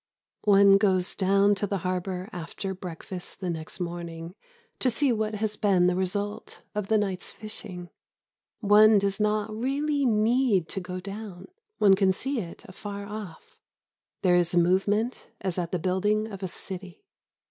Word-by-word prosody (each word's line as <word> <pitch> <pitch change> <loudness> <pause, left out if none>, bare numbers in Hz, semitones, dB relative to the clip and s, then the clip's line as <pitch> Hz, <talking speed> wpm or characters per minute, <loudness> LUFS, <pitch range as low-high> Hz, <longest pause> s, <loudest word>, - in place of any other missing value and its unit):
One 200 -1 +7
goes 190 -3 +2
down 200 +1 +4
to 205 +1 -1
the 200 - -1
harbour 185 0 -2
after 180 +3 -5
breakfast 180 0 -7
the 185 -3 -2
next 160 +2 -6
morning 170 -1 -5 0.5
to 260 - +2
see 260 +3 +2
what 215 -1 -1
has 210 0 -1
been 195 -4 +3
the 180 0 +3
result 200 +3 -3
of 210 -2 -2
the 220 - +3
night's 195 -3 -2
fishing. 185 -4 -9 0.7
One 210 +1 +7
does 200 0 0
not 210 0 0
really 280 +5 0
need 220 -4 +3
to - - -3
go 185 0 -5
down. 195 -2 -8 0.3
One 200 -2 +6
can 190 -1 +3
see 270 +6 -2
it 170 -5 -8
afar 200 +1 -7
off. 205 -5 -9 0.6
There 180 -2 +5
is 175 0 +2
movement 195 +7 +2
as 190 -2 -2
at 170 -1 -3
the 180 - +1
building 205 +5 0
of 195 -1 -8
a 190 - -2
city. 185 - -7
195 Hz, 160 wpm, -27 LUFS, 180-210 Hz, 0.7 s, One